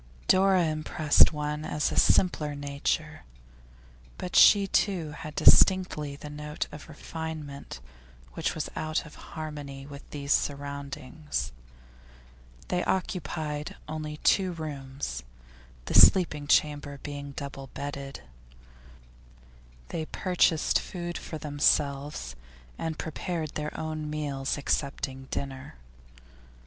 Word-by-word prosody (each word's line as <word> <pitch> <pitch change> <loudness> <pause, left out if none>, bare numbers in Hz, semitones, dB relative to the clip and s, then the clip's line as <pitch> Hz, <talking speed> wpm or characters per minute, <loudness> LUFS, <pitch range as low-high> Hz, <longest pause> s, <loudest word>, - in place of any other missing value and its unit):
Dora 190 -1 +5
impressed 155 -1 +4
one 150 0 -3
as 150 -1 0
a - - -3
simpler 150 -5 +3
nature, 140 0 -2 1.0
but 180 - -5
she 200 -1 +8
too 185 -5 +1
had 150 0 -8
distinctly 180 -7 +5
the 145 - -9
note 150 +1 -4
of 150 +2 -10
refinement 155 - -6 0.5
which - - -1
was - - -2
out 155 +1 -1
of 150 - -12
harmony 145 -3 -7
with 140 0 -11
these 140 -1 0
surroundings. 140 - -3 1.2
They 180 - +1
occupied 155 -5 -2
only 155 -1 -5
two 185 -2 +3
rooms, 135 - -5 0.6
the - - -4
sleeping 150 -6 +6
chamber 145 -1 +2
being 145 -1 -6
double 140 -1 -6
bedded; 140 -1 -5 1.7
they 160 - -3
purchased 175 -4 +2
food 175 -1 -5
for 160 - -5
themselves 145 - 0 0.4
and 160 -1 -3
prepared 160 -1 -3
their 150 0 -4
own 155 -1 -3
meals, 145 -3 -2
excepting 135 -2 -2
dinner. 135 -1 -5
150 Hz, 105 wpm, -28 LUFS, 140-160 Hz, 1.7 s, she